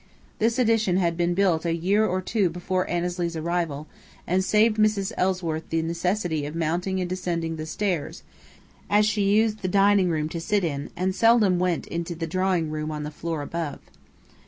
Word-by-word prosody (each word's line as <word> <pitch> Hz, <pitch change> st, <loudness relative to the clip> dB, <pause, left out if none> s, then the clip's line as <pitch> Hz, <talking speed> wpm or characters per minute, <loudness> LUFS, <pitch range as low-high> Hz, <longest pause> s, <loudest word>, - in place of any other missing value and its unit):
This 225 Hz, +2 st, +2 dB
addition 225 Hz, -7 st, +2 dB
had 170 Hz, -3 st, +1 dB
been 175 Hz, 0 st, 0 dB
built 180 Hz, -4 st, +2 dB
a 165 Hz, -1 st, 0 dB
year 195 Hz, +6 st, +2 dB
or 185 Hz, -3 st, 0 dB
two 200 Hz, -2 st, +1 dB
before 180 Hz, +2 st, -2 dB
Annesley's 175 Hz, -1 st, -2 dB
arrival, 160 Hz, -3 st, -2 dB, 0.4 s
and 185 Hz, +2 st, +1 dB
saved 215 Hz, +3 st, +3 dB
Mrs. 210 Hz, -2 st, +2 dB
Ellsworth 180 Hz, -4 st, -1 dB
the 165 Hz, 0 st, 0 dB
necessity 170 Hz, -1 st, -1 dB
of 150 Hz, -, -7 dB
mounting 175 Hz, +4 st, -1 dB
and 180 Hz, -, -1 dB
descending 175 Hz, -3 st, -2 dB
the 155 Hz, 0 st, -6 dB
stairs, 175 Hz, -4 st, -2 dB, 0.7 s
as 210 Hz, +1 st, +4 dB
she 210 Hz, 0 st, 0 dB
used 215 Hz, +1 st, +2 dB
the 190 Hz, -, -3 dB
dining 195 Hz, 0 st, +4 dB
room 155 Hz, -2 st, 0 dB
to 165 Hz, 0 st, -5 dB
sit 205 Hz, +3 st, 0 dB
in 145 Hz, -4 st, -3 dB
and 185 Hz, +2 st, -1 dB
seldom 215 Hz, -4 st, +4 dB
went 180 Hz, -2 st, 0 dB
into 170 Hz, 0 st, -4 dB
the 165 Hz, 0 st, -3 dB
drawing 180 Hz, -2 st, 0 dB
room 155 Hz, 0 st, -3 dB
on 150 Hz, -1 st, -4 dB
the 150 Hz, -, -5 dB
floor 160 Hz, -1 st, -4 dB
above. 165 Hz, -1 st, -4 dB
180 Hz, 180 wpm, -25 LUFS, 165-195 Hz, 0.7 s, as